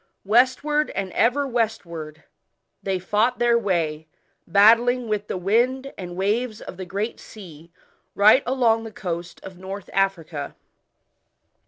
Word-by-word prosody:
Westward, 260 +7 +2
and 195 -1 -3
ever 250 +9 +2
westward, 170 - -3 0.6
they 195 -1 -1
fought 210 +7 0
their 240 0 +3
way 165 -8 -1 0.4
battling 230 +6 +4
with 210 -1 -2
the - - -3
wind 245 +8 0
and 175 -2 -8
waves 215 +4 -1
of 180 - -10
the 190 - -6
Great 205 +5 -3
Sea 170 -6 -13 0.4
right 215 +6 +6
along 235 -3 +2
the 225 - -8
coast 175 -4 -6
of 190 -2 -11
North 195 +1 -8
Africa. 170 -7 -2
205 Hz, 130 wpm, -23 LUFS, 180-235 Hz, 0.6 s, right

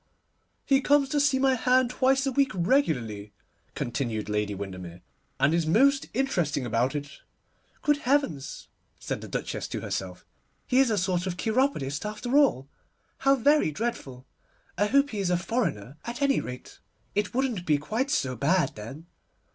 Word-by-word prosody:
'He 275 -1 +3
comes 285 0 +3
to 290 - +1
see 280 -2 +3
my 265 0 +3
hand 255 0 +2
twice 270 +1 +2
a 270 - 0
week 275 +1 +2
regularly,' 125 - 0 0.4
continued 115 -4 -3
Lady 105 -1 -1
Windermere, 90 -3 -7 0.4
'and 135 +4 +3
is 165 -1 +1
most 275 - +3
interesting 175 - 0
about 120 +4 0
it.' 145 -1 -6 0.6
'Good 295 -1 +3
heavens!' 255 - -1 0.3
said - - -4
the - - -8
Duchess - - -4
to - - -5
herself, 90 -1 -5 0.4
'he 255 - +2
is 270 -2 +4
a 215 - +1
sort 180 -1 0
of 180 -1 -3
cheiropodist 220 - 0
after 215 +5 -3
all. 270 - +3 0.5
How 275 0 +4
very 285 - +3
dreadful. 145 - -4 0.5
I 205 +3 +1
hope 280 +5 +3
he 210 - -4
is 190 -2 0
a 180 - +2
foreigner 155 - -2
at 235 +1 -6
any 275 -1 +3
rate. 125 0 -9 0.3
It 205 +3 -1
wouldn't 245 -9 -1
be 150 -2 +4
quite 220 - -2
so 130 - 0
bad 150 +5 +1
then. 130 +10 -9
190 Hz, 165 wpm, -27 LUFS, -, 0.6 s, is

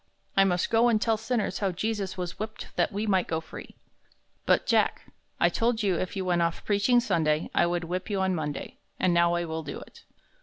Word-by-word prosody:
I 195 - +6
must 180 -2 0
go 230 +1 +4
and 220 -2 +3
tell 225 0 +2
sinners 225 +1 -2
how 195 -2 0
Jesus 195 +1 -3
was 180 -1 -5
whipped 215 +1 -7
that - - +1
we 205 +2 -2
might 190 -4 +2
go 160 - -1
free." 160 - -11 0.7
"But, - - +3
Jack, - - +1 0.3
I - - +5
told 230 -1 0
you 195 -3 +2
that - - -1
if 185 - -4
you 190 -1 -2
went 175 -1 +2
off 170 0 -1
preaching 210 +4 +3
Sunday, 160 -9 0
I - - +4
should 175 0 -1
whip 180 +4 -4
you 200 -2 -1
on 190 0 +1
Monday, 150 -4 -4 0.2
and 185 -2 +2
now 170 0 +3
I 175 0 -1
will 160 0 -4
do - - -6
it." - - -15
190 Hz, 225 wpm, -27 LUFS, 170-215 Hz, 0.7 s, I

